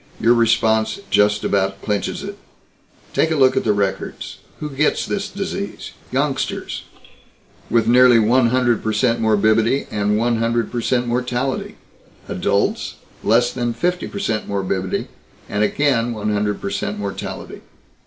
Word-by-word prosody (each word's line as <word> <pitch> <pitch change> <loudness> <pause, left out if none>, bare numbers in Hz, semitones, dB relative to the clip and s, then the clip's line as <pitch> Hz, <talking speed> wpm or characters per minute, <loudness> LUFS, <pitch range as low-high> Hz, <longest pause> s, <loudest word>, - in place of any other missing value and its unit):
Your 115 +1 +5
response 115 - +2
just 105 +1 +3
about 95 -1 0
clinches 105 -2 -2
it. - - -7 0.7
Take 160 - +2
a 160 - +1
look 130 -3 +4
at - - +1
the 110 - +2
records. 100 -1 -3 0.2
Who 150 -1 -5
gets 145 +3 +1
this 200 -1 -3
disease? 200 0 -5 0.2
Youngsters 135 +1 -2 0.8
with 115 -1 +3
nearly 125 0 +6
one 120 +3 +4
hundred 120 -2 +2
per 110 - -1
cent 115 +2 +2
morbidity 110 +4 +2
and 105 0 +1
one 115 +1 +1
hundred 115 +1 0
per 120 - -2
cent 125 +1 +1
mortality. 125 +2 -2 0.5
Adults - - 0 0.3
less 120 +3 +3
than 120 -2 -2
fifty 180 +7 -1
per - - -8
cent 110 - -2
morbidity 95 -1 -2 0.4
and 105 +1 0
again 120 0 +1
one 105 0 -1
hundred 105 0 -1
per 100 - -3
cent 100 +1 -2
mortality. 100 -1 -6
115 Hz, 145 wpm, -20 LUFS, 105-125 Hz, 0.8 s, nearly